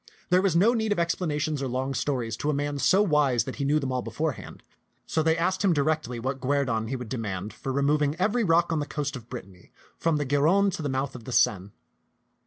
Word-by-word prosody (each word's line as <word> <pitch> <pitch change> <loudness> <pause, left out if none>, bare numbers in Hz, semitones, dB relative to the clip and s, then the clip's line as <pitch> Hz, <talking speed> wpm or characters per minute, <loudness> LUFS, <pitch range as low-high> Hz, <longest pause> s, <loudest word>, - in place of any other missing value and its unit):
There 180 +1 +5
was 190 -4 +1
no 205 +8 +5
need 220 -2 -1
of 205 - +1
explanations 155 -4 -1
or 135 - -1
long 130 +2 -2
stories 125 -4 -2
to 150 - -2
a 150 - +1
man 145 0 -2
so 190 +8 +4
wise 150 - +2
that - - -7
he 140 - -2
knew 145 +2 +3
them 135 -3 -2
all 130 -1 -1
beforehand; 130 +7 -4 0.4
so 160 - 0
they 160 +1 +2
asked 180 +4 0
him 190 -3 +4
directly 145 -5 0
what 130 +2 -3
guerdon 130 -5 0
he 135 - -3
would 125 -2 -6
demand 105 -4 -4
for 135 - -5
removing 145 +2 +1
every 210 +7 +1
rock 170 -2 +3
on 160 - 0
the 145 - -3
coast 145 -2 -3
of 120 -2 -10
Brit 125 - -6
tany 95 -2 -19 0.3
from 165 -2 +1
the 145 - -1
Gironde 165 +9 +3
to - - -4
the 145 - -2
mouth 135 +1 -2
of 120 -3 -10
the - - -6
Seine. 100 -4 +2
145 Hz, 235 wpm, -26 LUFS, 125-165 Hz, 0.4 s, There